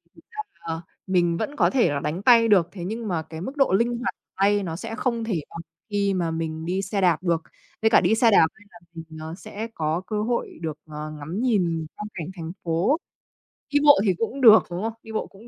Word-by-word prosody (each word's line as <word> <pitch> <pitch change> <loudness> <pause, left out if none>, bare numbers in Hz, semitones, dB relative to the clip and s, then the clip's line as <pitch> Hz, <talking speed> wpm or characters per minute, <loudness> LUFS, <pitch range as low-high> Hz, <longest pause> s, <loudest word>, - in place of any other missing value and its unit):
thực - - -17
chất 430 0 -6 0.2
là 165 0 -3 0.3
mình 175 -2 +2
vẫn 290 - -3
có - - +3
thể 245 - +3
là 145 -1 -1
đánh 155 +6 -3
tay 230 -2 +6
được 185 -6 +4
thế 180 -4 -7
nhưng 220 +2 -4
mà 170 -4 -1
cái 160 +1 -9
mức 270 +9 -6
độ 270 -9 +3
linh 235 +4 +2
hoạt 245 - -3 0.2
tay 200 +1 +2
nó 165 -3 -4
sẽ 225 +5 -6
không 235 -2 -1
thể 190 -9 -1
bằng 170 - -8 0.3
khi 200 -1 +1
mà 170 -3 -1
mình 160 0 -4
đi 185 +3 -1
xe 195 +1 -2
đạp 175 -1 +2
được. 170 -2 +1 0.4
Với 220 - +4
cả - - +6
đi 195 +5 +3
xe 230 -1 +4
đạp, 160 -5 +6 0.2
là 175 - -16
mình, 165 -1 -8 0.2
ờ, 160 +1 -6
sẽ 215 +1 -6
có 160 +2 -1
cơ 210 -1 -1
hội 235 +2 -2
được, 155 -2 -4
ờ, 155 0 -7
ngắm 155 +6 -6
nhìn 175 -10 +1
quang 210 - -6
cảnh 165 -2 -5
thành 165 -1 -6
phố. 175 - +1 0.7
Đi 290 - +4
bộ 290 -7 +7
thì 190 - +3
cũng 255 +4 -3
được, 220 -3 +9
đúng 175 +2 -4
không? 225 0 -2
Đi 225 - -10
bộ 220 - -2
cũng 215 +4 -16
190 Hz, 240 wpm, -24 LUFS, 165-225 Hz, 0.7 s, được